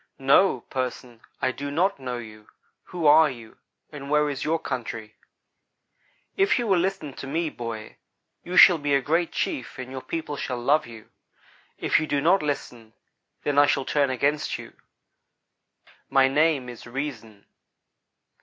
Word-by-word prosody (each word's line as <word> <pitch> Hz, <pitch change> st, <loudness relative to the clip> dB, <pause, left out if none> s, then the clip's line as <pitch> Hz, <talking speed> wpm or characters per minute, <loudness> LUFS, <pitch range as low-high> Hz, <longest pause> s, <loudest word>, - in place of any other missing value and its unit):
"'No, 135 Hz, +1 st, +4 dB
"person," 125 Hz, -2 st, -5 dB, 0.2 s
I 130 Hz, -, +2 dB
do 140 Hz, +2 st, -6 dB
not 175 Hz, +4 st, 0 dB
know 125 Hz, -2 st, -4 dB
you. 110 Hz, -2 st, -11 dB, 0.4 s
Who 175 Hz, -3 st, -5 dB
are 155 Hz, +1 st, +7 dB
you, 115 Hz, -4 st, -11 dB, 0.3 s
and 140 Hz, -2 st, -8 dB
where 150 Hz, 0 st, +2 dB
is 140 Hz, 0 st, -5 dB
your 160 Hz, +2 st, +1 dB
country?' 115 Hz, -6 st, -5 dB, 1.2 s
"'If 390 Hz, -6 st, +3 dB
you 240 Hz, -, -1 dB
will 195 Hz, -5 st, +3 dB
listen 185 Hz, -6 st, -2 dB
to 135 Hz, -, -8 dB
me, 160 Hz, +2 st, -1 dB
boy, 115 Hz, -2 st, -7 dB, 0.5 s
you 180 Hz, +1 st, -4 dB
shall 175 Hz, -3 st, +8 dB
be 145 Hz, -1 st, +1 dB
a -, -, +4 dB
great 165 Hz, +5 st, 0 dB
chief 125 Hz, -, -3 dB
and 130 Hz, 0 st, -7 dB
your 130 Hz, -1 st, -6 dB
people 155 Hz, -2 st, -5 dB
shall 125 Hz, -2 st, -3 dB
love 140 Hz, +3 st, +2 dB
you. 115 Hz, -2 st, -13 dB, 0.7 s
If -, -, +2 dB
you 155 Hz, -, -3 dB
do 145 Hz, -, 0 dB
not 175 Hz, +7 st, +3 dB
listen, 120 Hz, -6 st, -5 dB, 0.5 s
then 145 Hz, -1 st, +2 dB
I 145 Hz, -, +6 dB
shall 135 Hz, -1 st, +1 dB
turn 145 Hz, -2 st, +1 dB
against 140 Hz, +3 st, 0 dB
you. -, -, -11 dB, 1.4 s
My 135 Hz, -1 st, +4 dB
name 145 Hz, -1 st, +2 dB
is 120 Hz, -1 st, -10 dB
"Reason."' 120 Hz, -6 st, -6 dB
140 Hz, 160 wpm, -25 LUFS, 125-155 Hz, 1.4 s, shall